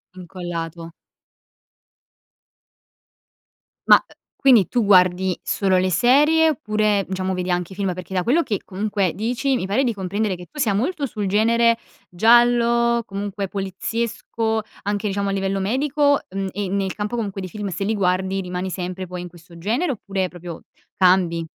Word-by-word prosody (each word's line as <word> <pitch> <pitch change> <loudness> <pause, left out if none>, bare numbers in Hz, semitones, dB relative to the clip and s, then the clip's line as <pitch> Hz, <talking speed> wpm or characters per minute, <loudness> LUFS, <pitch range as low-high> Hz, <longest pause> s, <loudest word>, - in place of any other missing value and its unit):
Incollato. 170 -2 -6 3.0
Ma, - - +10
uhm, - - -8 0.3
quindi 245 -9 +5
tu 240 -3 0
guardi 185 -1 +4
solo 190 -2 +1
le 185 +1 +2
serie 300 - +4
oppure 215 -6 0
diciamo 190 0 -2
vedi 180 0 -2
anche 180 +1 -2
i - - -12
film? 195 -2 -1
Perché, 185 +1 -8
da 180 -1 0
quello 285 +8 +3
che 215 - -3
comunque 200 -2 -1
dici, 245 +6 -1
mi 245 - -2
pare 215 +8 +1
di 240 - 0
comprendere 200 0 -2
che 175 0 -11
tu 300 - -10
sia 215 -7 +2
molto 280 - -1
sul 210 -6 -4
genere 230 +3 +3 0.3
giallo, 235 +3 +4
comunque 200 0 -4
poliziesco, 220 +3 -2 0.2
anche 205 +1 -1
diciamo 200 0 -1
a - - 0
livello 195 0 -1
medico, 285 +7 +2
mhmm, 195 +1 -3
e 200 0 -3
nel 195 -1 -1
campo 210 +3 -3
comunque 205 -4 -3
dei 185 - -6
film, 210 0 -5
se 185 +3 -4
li 215 - 0
guardi 190 0 0
rimani 180 0 -4
sempre 185 0 -5
poi 180 0 -6
in 180 - -7
questo 170 0 -16
genere, 235 - -1
oppure 195 -5 -3
proprio 175 -2 -9 0.3
cambi? 180 -3 +3
195 Hz, 160 wpm, -21 LUFS, 185-230 Hz, 3.0 s, Ma